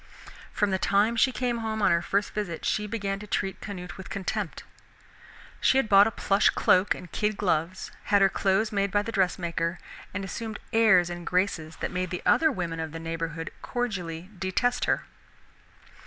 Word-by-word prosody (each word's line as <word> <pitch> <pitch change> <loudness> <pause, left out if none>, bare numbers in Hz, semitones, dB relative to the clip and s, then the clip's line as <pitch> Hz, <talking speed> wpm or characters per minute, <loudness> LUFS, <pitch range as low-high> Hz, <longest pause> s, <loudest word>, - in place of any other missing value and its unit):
From 205 -1 0
the 190 - 0
time 205 +5 +2
she 260 +3 +4
came 245 -2 -1
home 220 -1 -3
on 205 - +3
her 170 0 +3
first 200 +3 0
visit 180 -6 -4
she 210 0 0
began 200 -2 -3
to 210 - -9
treat 195 -2 -2
Canute 180 -4 -7
with 190 - -9
contempt. 200 -1 -3 1.0
She 260 - +4
had 270 - +2
bought 200 0 +7
a - - +2
plush 200 -1 +2
cloak 185 +2 +3
and 180 -3 -11
kid 210 -1 -1
gloves, 175 -1 -1
had 205 - +4
her - - +7
clothes 195 +3 +1
made 200 -1 +1
by 205 +1 +1
the 230 - -4
dress 190 -4 +1
maker, 170 0 -2 0.3
and 195 +1 -4
assumed 220 +2 -5 0.2
airs 190 -6 +5
and 175 0 -6
graces 180 -4 0
that - - -2
made 180 0 -2
the 180 0 -5
other 315 -1 +4
women 170 -7 -3
of 160 -1 -4
the 165 - -5
neighborhood 165 0 -4
cordially 185 -7 -4
detest 245 +7 0
her. - - 0
195 Hz, 185 wpm, -27 LUFS, 175-215 Hz, 1.0 s, bought